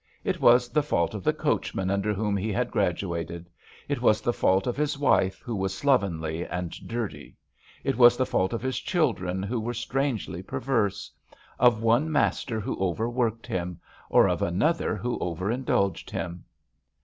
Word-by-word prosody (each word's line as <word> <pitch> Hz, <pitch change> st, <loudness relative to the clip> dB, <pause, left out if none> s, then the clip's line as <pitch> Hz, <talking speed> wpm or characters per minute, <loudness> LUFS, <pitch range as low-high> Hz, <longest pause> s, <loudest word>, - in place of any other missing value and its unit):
It -, -, -2 dB
was 120 Hz, +1 st, +5 dB
the 150 Hz, -, +2 dB
fault 85 Hz, -, 0 dB
of 105 Hz, -3 st, -6 dB
the -, -, +3 dB
coachmen 95 Hz, 0 st, -1 dB
under 100 Hz, +2 st, 0 dB
whom 105 Hz, 0 st, -1 dB
he 105 Hz, +3 st, -1 dB
had -, -, -1 dB
graduated; 85 Hz, +1 st, -2 dB, 0.4 s
it 140 Hz, -4 st, -2 dB
was 110 Hz, -3 st, +4 dB
the 120 Hz, -, 0 dB
feult 95 Hz, -3 st, +2 dB
of 125 Hz, -, -1 dB
his 150 Hz, 0 st, -1 dB
wife, 95 Hz, -9 st, +2 dB
who 120 Hz, -, -3 dB
was 95 Hz, -1 st, -2 dB
slovenly 85 Hz, -, +1 dB
and 90 Hz, -2 st, -4 dB, 0.2 s
dirty; 115 Hz, -3 st, -5 dB, 0.5 s
it 135 Hz, -, 0 dB
was 120 Hz, 0 st, +8 dB
the 130 Hz, -, +2 dB
ifault 95 Hz, -6 st, 0 dB
of 115 Hz, -, -3 dB
his 130 Hz, -1 st, -1 dB
children, 105 Hz, -, 0 dB
who 115 Hz, +4 st, -2 dB
were 120 Hz, +2 st, -3 dB
strangely 120 Hz, -, -2 dB
perverse; 105 Hz, -2 st, -1 dB, 0.5 s
of 115 Hz, -3 st, +4 dB
one 120 Hz, +8 st, +3 dB
master 130 Hz, -5 st, 0 dB
who 105 Hz, -, -4 dB
overworked 115 Hz, +4 st, -1 dB
him, 90 Hz, -1 st, -3 dB, 0.3 s
or -, -, +5 dB
of -, -, -1 dB
another 150 Hz, -, +1 dB
who 120 Hz, 0 st, -3 dB
over 90 Hz, +4 st, -2 dB
indulged 100 Hz, -7 st, 0 dB
him. 85 Hz, 0 st, -5 dB
110 Hz, 170 wpm, -26 LUFS, 95-125 Hz, 0.5 s, was